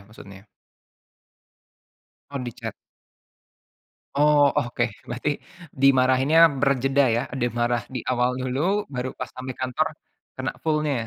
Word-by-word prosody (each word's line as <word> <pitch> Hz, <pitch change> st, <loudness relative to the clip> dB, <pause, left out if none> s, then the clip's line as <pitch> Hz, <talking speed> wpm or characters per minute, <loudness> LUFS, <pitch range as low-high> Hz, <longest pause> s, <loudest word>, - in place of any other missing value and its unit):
maksudnya? 100 Hz, -1 st, -14 dB, 1.8 s
Oh, 140 Hz, -, -4 dB
di-chat. 120 Hz, -, -6 dB, 1.4 s
Oh, 145 Hz, 0 st, +5 dB
oke, 120 Hz, -3 st, 0 dB, 0.2 s
berarti 130 Hz, +5 st, -2 dB, 0.3 s
dimarahinnya 135 Hz, +4 st, +5 dB
berjeda, 135 Hz, 0 st, +2 dB
ya, 120 Hz, +2 st, +1 dB
dia 120 Hz, -1 st, 0 dB
marah 120 Hz, 0 st, 0 dB
di 130 Hz, -, -3 dB
awal 125 Hz, 0 st, +2 dB
dulu 155 Hz, +11 st, 0 dB
baru 130 Hz, -1 st, -4 dB
pas -, -, -6 dB
sampai 130 Hz, 0 st, -5 dB
kantor 130 Hz, +5 st, 0 dB, 0.5 s
kena 130 Hz, 0 st, -3 dB
full-nya. 150 Hz, -4 st, +1 dB
130 Hz, 110 wpm, -24 LUFS, 120-145 Hz, 1.8 s, Oh